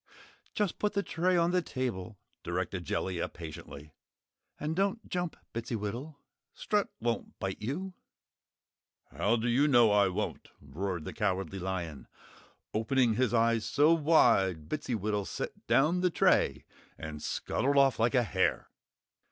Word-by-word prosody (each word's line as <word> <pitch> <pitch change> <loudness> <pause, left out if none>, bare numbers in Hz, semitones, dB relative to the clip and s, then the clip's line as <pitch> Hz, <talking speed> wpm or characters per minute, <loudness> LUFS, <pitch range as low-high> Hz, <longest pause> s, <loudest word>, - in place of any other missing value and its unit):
"Just 210 -4 -1
put 210 0 0
the 200 -1 0
tray 180 +1 +1
on 170 0 +3
the 180 0 +2
table," 115 - -4 0.2
directed - - -3
Jellia, 90 -3 -2
patiently. 80 -2 -10 0.7
"And 155 +2 -2
don't 200 +4 0
jump, 175 -2 -2 0.2
Bittsywittle! 115 +5 -4 0.4
Strut 210 -1 0
won't 115 0 -3
bite 95 +1 -4
you." 175 - -3 1.2
"How 110 +3 +1
do 115 +1 -1
you 130 +5 +3
know 120 -6 +6
I 100 -1 +5
won't?" 90 - -3
roared 85 +4 -4
the - - -5
Cowardly 95 +1 -1
Lion, 90 -5 -4 0.7
opening 115 +2 +2
his 125 +1 +1
eyes 115 -1 +2
so 150 +7 +4
wide 115 - +3
Bittsywittle 105 -8 -2
set - - -6
down 160 +6 +3
the 180 - +3
tray 165 - +2 0.3
and 80 -2 -7
scuttled 140 - -1
off 135 -3 +4
like 115 +2 +2
a 125 - +4
hare. 95 - 0
115 Hz, 135 wpm, -30 LUFS, 95-155 Hz, 1.2 s, know